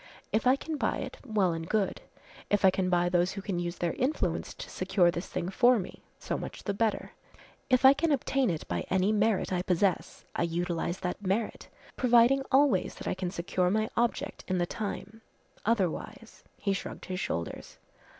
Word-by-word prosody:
If 220 +3 +1
I 255 - +6
can 310 +2 -5
buy - - 0
it, 265 -2 -6
well 210 -8 +1
and 165 0 -5
good. 210 -3 0 0.5
If 205 -1 +3
I 190 - +7
can 185 0 0
buy 175 -1 +3
those 175 +1 +2
who 195 - -5
can 190 -4 -2
use 175 0 -3
their 170 -2 -1
influence 255 - -1
to - - -8
secure 185 -1 +2
this 170 +2 -5
thing 175 - -3
for 245 +5 +5
me, 185 - -6 0.2
so - - -3
much - - -7
the 200 - -1
better. 220 +1 -1 0.6
If 255 0 +4
I 265 - +10
can 310 +3 0
obtain 270 -2 +1
it 160 -3 -3
by 85 0 -2
any 190 +2 +2
merit 215 -2 +1
I 180 - +1
possess, 180 +1 0
I - - -1
utilize 170 +1 -1
that 180 +2 -3
merit, 200 +4 -1 0.3
providing 245 +2 +5
always, 265 -8 +3
that - - -8
I - - +1
can 185 -1 -3
secure 180 +1 0
my 215 +3 0
object 235 0 -1
in 185 - 0
the 175 - +1
time, 220 +2 -5 0.5
otherwise 225 +3 -2
" - - -39
He 200 - +2
shrugged 195 - -6
his 185 -1 -4
shoulders. 85 - -4
195 Hz, 195 wpm, -29 LUFS, 180-230 Hz, 0.6 s, I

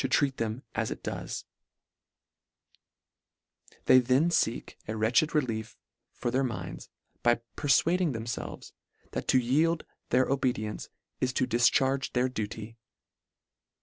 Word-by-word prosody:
123 120 -4 -2 2.4
They 130 - +8
then 130 +7 +3 0.2
leek 115 - -7
a 110 - -3
wretched 120 +9 +2
relief 115 -7 -1 0.4
for 120 - -2
their 130 +2 +2
minds, 90 -8 -5 0.3
by 120 -1 +3 0.2
perfuading 165 +4 +3
themfelves, 115 -1 -5 0.4
that - - -4
to - - +5
yield 155 +7 +2 0.2
their 130 +2 +3
obedience 125 -6 -1 0.3
is 130 - +1
to - - +2
difcharge 130 +3 +2
their 125 +1 +2
duty. 110 -1 -5
125 Hz, 100 wpm, -29 LUFS, 115-135 Hz, 2.4 s, They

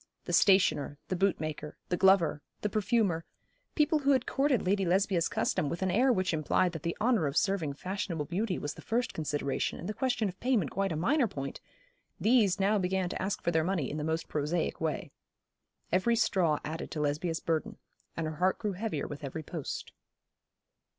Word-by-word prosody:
The - - -4
stationer, 190 -7 +4
the 185 - 0
bootmaker, 155 -5 -1
the 180 - +1
glover, 180 -6 +4 0.2
the 210 - 0
perfumer, 200 -5 +1 0.5
people 300 0 +3
who 280 0 +3
had 260 -2 +1
courted 275 -4 +1
Lady 195 +1 +2
Lesbia's 185 -1 +2
custom 145 - 0
with 170 +4 -3
an 190 - +1
air 250 +7 +4
which 185 -6 +1
implied 160 +3 +2
that 160 -3 -6
the 170 +2 -3
honour 220 - +2
of 140 +3 -2
serving 195 -8 +1
fashionable 180 -1 -3
beauty 185 +4 -1
was 145 - -4
the - - -12
first 240 +2 -1
consideration, 145 -3 -2
and 175 - -7
the 215 - -2
question 245 -3 0
of 190 0 -7
payment 235 - +1
quite 195 0 -1
a - - -1
minor 240 - +2
point 140 -8 -6 0.6
these 215 -5 +3
now 200 +2 +3
began 185 -1 0
to - - -4
ask 195 +1 -2
for 170 - +1
their 160 -1 +2
money 170 -6 -1
in 150 - -4
the 150 - -3
most 160 +1 -1
prosaic 155 +3 -1
way. 160 -2 -2 0.8
Every 190 +6 +3
straw 175 -8 +2
added 160 +2 -5
to 155 - -5
Lesbia's 155 +3 -1
burden; 160 -2 -2 0.4
and 165 - -1
her 155 -1 -4
heart 185 +3 +2
grew 210 -3 -2
heavier 190 -6 -3
with 145 0 -7
every 145 +3 -5
post. 155 -1 -5
180 Hz, 190 wpm, -30 LUFS, 155-205 Hz, 0.8 s, stationer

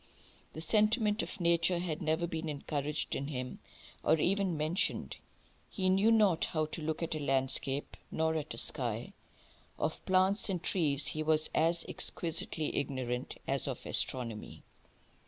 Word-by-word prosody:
The 160 - -6
sentiment 215 +3 +2
of 210 - -6
nature 170 +1 +3
had 170 -3 -3
never 160 +2 +1
been 165 -2 -4
encouraged 145 0 -3
in 140 - -2
him, 125 -3 -5 0.4
or - - +4
even 185 +1 +1
mentioned. 155 +5 0 0.5
He 185 -3 0
knew 195 +4 +4
not 205 -7 +4
how 155 -1 -1
to 155 +1 -7
look 155 +2 -2
at 165 - -2
a 155 - -3
landscape 135 0 0
nor 160 0 0
at 155 -2 -3
a - - -8
sky. - - -2 0.6
Of 155 - -2
plants 190 +2 +4
and 180 -3 -2
trees 150 -7 +1
he 155 - -2
was 155 0 +2
as 165 +1 +2
exquisitely 165 -2 -1
ignorant 130 -3 -3
as 135 +1 +1
of 130 -3 -5
astronomy. 115 -4 -1
160 Hz, 150 wpm, -32 LUFS, 145-180 Hz, 0.6 s, or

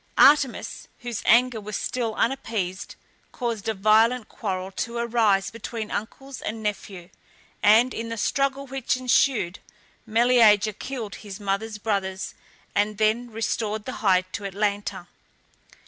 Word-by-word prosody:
Artemis, 280 -2 +4
whose 240 -3 -4
anger 235 0 +4
was 210 0 -6
still 235 -4 -2
unappeased, 220 -8 -2 0.4
caused 230 -4 -3
a 220 - -1
violent 220 +4 +3
quarrel 190 -2 -4
to 235 +4 -4
arise 225 -5 +2
between 230 -1 -6
uncles 270 +5 -6
and 220 0 -5
nephew, 195 -4 -4 0.5
and, 225 +5 +5
in 230 0 -4
the 230 - -4
struggle 275 +5 0
which 265 -2 -1
ensued, 250 -7 +2 0.5
Meleager 220 -2 +5
killed 230 -2 -6
his 205 -1 -8
mother's 205 +2 -2
brothers, 195 -3 -2 0.4
and 205 0 +1
then 220 +3 +1
restored 220 -1 -2
the 255 - -5
hide 185 -3 +3
to 205 - -4
Atalanta. 200 -2 -2
220 Hz, 130 wpm, -25 LUFS, 205-240 Hz, 0.5 s, and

